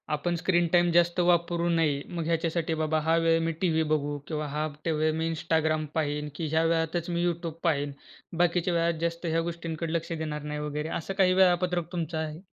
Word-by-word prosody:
आपण 175 +4 -1
screen 175 +1 +2
time 175 0 +5
जास्त 170 +1 +3
वापरू 175 -1 +2
नये. 160 -4 +2
मग 170 -2 -3
ह्याच्यासाठी 165 0 0
बाबा 155 0 +1
हा 165 - +4
वेळ 165 0 +3
मी 165 - 0
टीव्ही 160 -3 +2
बघू 145 -1 -1
किंवा 155 -2 -3
हा 150 +2 -2 0.2
टा 165 - +1
वेळ 155 0 +1
मी 160 0 0
Instagram 155 -1 0
पाहीन, 150 -1 -1
की 160 0 -3
ह्या 160 +1 +3
वेळातचं 165 +1 0
मी 170 0 0
YouTube 170 -2 -3
पाहीन. 145 -4 +1 0.5
बाकीच्या 175 +1 +2
वेळात 170 -1 +1
जास्त 170 +1 -2
ह्या 165 0 +1
गोष्टींकडे 165 -1 -4
लक्ष 165 0 -2
देणार 155 -2 -4
नाही 150 0 -4
वगैरे. 150 +1 -3
असं 180 +4 -5
काही 190 -2 +3
वेळापत्रक 180 -2 +2
तुमचं 170 -2 -3
आहे? 155 0 -4
165 Hz, 195 wpm, -28 LUFS, 155-170 Hz, 0.5 s, time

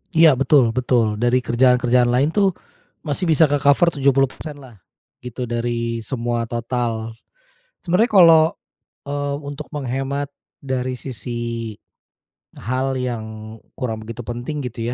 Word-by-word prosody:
Iya, 160 -2 +7
betul 130 -2 +3
betul. 120 -4 +1
Dari 120 +1 +3
kerjaan-kerjaan 125 0 +3
lain 135 +6 +2
tuh 200 -2 +3 0.6
masih 155 +4 -2
bisa 160 0 +5
ke-cover 145 +3 +3
70% 140 +1 0
lah 130 -5 -14 0.5
gitu 125 0 -6
dari 115 0 -2
semua 120 -1 -2
total. 115 -1 -3 0.7
Sebenarnya 190 +7 +2
kalau, 165 -5 +7 0.6
eee, 145 0 -2
untuk 145 +1 -7
menghemat 135 0 -3 0.3
dari 130 -2 -3
sisi 120 -2 -5 0.8
hal 130 +3 -2
yang 110 -3 -5 0.2
kurang 115 -4 -3
begitu 115 +1 -7
penting 120 +6 -5
gitu 120 -1 -4
125 Hz, 115 wpm, -21 LUFS, 120-140 Hz, 0.8 s, Iya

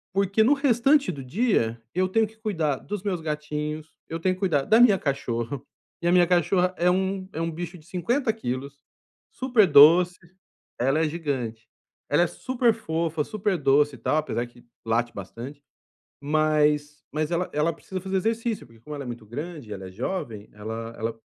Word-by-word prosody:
porque 200 +2 +2
no 265 +6 +5
restante 275 -1 +3
do 140 -5 -7
dia 130 - +1
eu 185 +1 +2
tenho 220 +4 +2
que 220 - -20
cuidar 165 - -1
dos 205 -1 -6
meus 190 -4 -1
gatinhos, 150 0 -4 0.2
eu 165 - -4
tenho 185 +2 +1
que - - -17
cuidar 160 -8 +1
da 220 +2 +4
minha 235 -5 +7
cachorra, 130 -2 -2 0.4
e 170 - 0
a - - +4
minha 180 -1 +6
cachorra 180 +1 +2
é 175 +1 +3
um 190 +1 0
é 160 - -3
um 165 - -1
bicho 175 +2 -6
de 155 - -18
50 225 - 0
quilos, 140 - -5 0.5
super 245 -7 +3
doce 170 +5 +7 0.6
ela 135 +5 +2
é 160 - +2
gigante, 125 -9 -4 0.4
ela 150 +4 +4
é 175 - +1
superfofa, 170 -12 0
super 205 0 -1
doce 145 0 +3
e - - -15
tal, 155 - +1
apesar 150 -6 -1
que 120 0 -20 0.2
late 120 +1 0
bastante, 125 +9 -8 0.6
mas 150 0 +1
mas 155 +1 -1
ela 175 +1 0
ela 155 +3 +1
precisa 185 -1 -7
fazer 190 +1 -2
exercício, 225 - -1
porque 115 -1 -20
como 150 +5 -8
ela 140 - -5
é - - -9
muito 120 -2 -7
grande, 145 -1 -7
ela 95 -1 -6
é - - -12
jovem, 115 - -4
ela 115 +2 -6
ela 115 0 -4
155 Hz, 185 wpm, -25 LUFS, 135-190 Hz, 0.6 s, minha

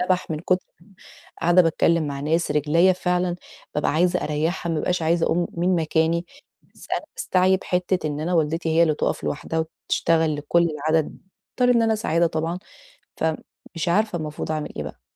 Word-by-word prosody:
اتنبح 180 -1 0
من 155 - -2
كُتر 185 +1 0 0.7
قاعدة 175 +2 +5
باتكلّم 165 -1 +2
مع 140 -1 -4
ناس، 160 +3 0
رجليّا 155 +5 +3
فعلًا 180 -1 -1 0.4
بابقى 150 - +1
عايزة 175 +3 +2
أريّحها، 160 +3 -1
ما - - 0
بابقاش 180 0 -1
عايزة 165 +1 +2
أقُوم 175 +1 +1
من 175 +1 +1
مكاني، 165 +1 +1 0.5
بس - - -15
أنا - - 0
باستعيِب 185 - +2
حِتّة 180 -2 0
إن 150 0 -3
أنا 175 +3 -1
والدتي 165 +1 0
هي 165 +1 +4
اللي 155 -2 +3
تُقف - - -2
لوحدها 160 +2 -3
وبتشتغل 160 -1 0
لكل 170 +4 +2
العدد، 155 +1 -1 0.4
باضطر 250 0 +4
إن 230 - +4
أنا 225 0 +2
أساعدها 170 -6 +1
طبعًا 165 +2 -2 0.6
فمش 160 +1 -4
عارفة 205 0 +1
المفروض 155 0 -4
أعمل 155 -1 -4
إيه - - -3
بقى؟ - - -9
165 Hz, 170 wpm, -23 LUFS, 155-180 Hz, 0.7 s, قاعدة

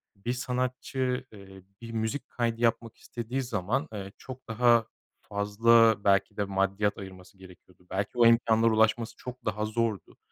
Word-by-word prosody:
bir 100 +5 -3
sanatçı, 130 0 -2
eee, 95 -2 -13 0.2
bir 115 0 -8
müzik 110 +5 -3
kaydı 115 -1 -2
yapmak 115 -1 0
istediği 120 +3 -5
zaman, 120 - -2
ııı, 100 -2 -6
çok 130 0 -11
daha 115 0 +3 0.3
fazla 110 +2 +4
belki 100 +1 +2
de 105 - +1
maddiyat 100 +1 0
ayırması 95 0 -11
gerekiyordu. 90 -1 -17
Belki 100 +1 -2
o 120 - +7
imkânlara 115 -1 +4
ulaşması 110 +1 +2
çok 125 0 -9
daha 105 0 -1
zordu. 110 -4 -2
110 Hz, 145 wpm, -28 LUFS, 100-120 Hz, 0.3 s, o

